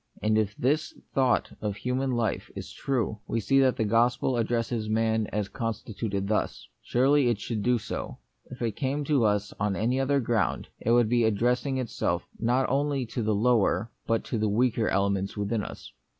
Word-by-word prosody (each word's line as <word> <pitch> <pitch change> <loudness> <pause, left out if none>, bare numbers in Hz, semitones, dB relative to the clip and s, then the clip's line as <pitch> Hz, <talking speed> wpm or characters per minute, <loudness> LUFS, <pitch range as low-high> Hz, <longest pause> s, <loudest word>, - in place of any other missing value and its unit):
And 110 0 +1
if 105 -1 +1
this 150 +5 0 0.2
thought 130 -3 +2
of 105 -2 -2
human 125 +5 -1
life 120 -2 -1
is - - -7
true, 115 -5 -1
we 115 - 0
see 135 +5 +3
that 130 -2 +4
the - - 0
gospel 120 +4 +2
addresses 115 -1 -1
man 110 0 +1
as 105 -1 -2
constituted 110 -2 -3
thus. 105 +1 -1
Surely 135 +1 +3
it 115 -4 0
should 110 0 -3
do 125 +3 +3
so. 105 - -5 0.3
If 125 -1 -7
it 115 -3 -1
came 140 +2 -1
to 140 -5 +2
us 105 -1 0
on 100 -1 0
any 120 +6 0
other 140 +1 +2
ground, 115 -3 0
it - - -2
would 120 -1 +5
be 120 +1 +2
addressing 125 +5 +1
it 130 -2 -2
self - - -2
not 125 +3 +2
only 140 -1 0
to 110 -1 -2
lower 115 +1 +2 0.2
but 115 -1 +1
to 110 -2 -1
weaker 115 +1 +2
elements 100 +1 0
within 105 +2 -1
us. - - -9
115 Hz, 180 wpm, -27 LUFS, 105-125 Hz, 0.3 s, would